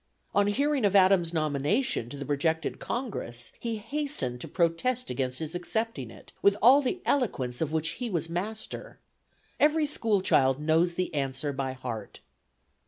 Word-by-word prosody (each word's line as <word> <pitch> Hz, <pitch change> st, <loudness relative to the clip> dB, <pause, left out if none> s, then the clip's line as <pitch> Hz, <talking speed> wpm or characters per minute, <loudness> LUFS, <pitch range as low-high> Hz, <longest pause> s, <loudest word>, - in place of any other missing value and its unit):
On 205 Hz, 0 st, +3 dB
hearing 280 Hz, +5 st, +1 dB
of 200 Hz, -1 st, +3 dB
Adams' 185 Hz, -3 st, +5 dB
nomination 155 Hz, -, 0 dB
to 140 Hz, -, -7 dB
the 140 Hz, -, -5 dB
projected 155 Hz, +2 st, 0 dB
Congress, 195 Hz, -, -4 dB
he 230 Hz, -1 st, -2 dB
hastened 225 Hz, -, -3 dB
to -, -, -5 dB
protest 210 Hz, +9 st, 0 dB
against 130 Hz, -1 st, -2 dB
his 160 Hz, +1 st, -5 dB
accepting 175 Hz, -, -2 dB
it, -, -, -14 dB
with 200 Hz, 0 st, +4 dB
all 260 Hz, +6 st, +7 dB
the 320 Hz, +7 st, -2 dB
eloquence 130 Hz, -, 0 dB
of 155 Hz, -2 st, 0 dB
which 160 Hz, 0 st, +1 dB
he 245 Hz, -, -1 dB
was 170 Hz, -5 st, -1 dB
master. 200 Hz, +6 st, -5 dB, 0.6 s
Every 305 Hz, +1 st, +4 dB
school 225 Hz, -9 st, +1 dB
child 135 Hz, -6 st, +3 dB
knows 165 Hz, +3 st, +2 dB
the 180 Hz, -1 st, -2 dB
answer 140 Hz, 0 st, -2 dB
by 135 Hz, -1 st, -2 dB
heart. 120 Hz, -5 st, -6 dB
170 Hz, 160 wpm, -28 LUFS, 140-230 Hz, 0.6 s, all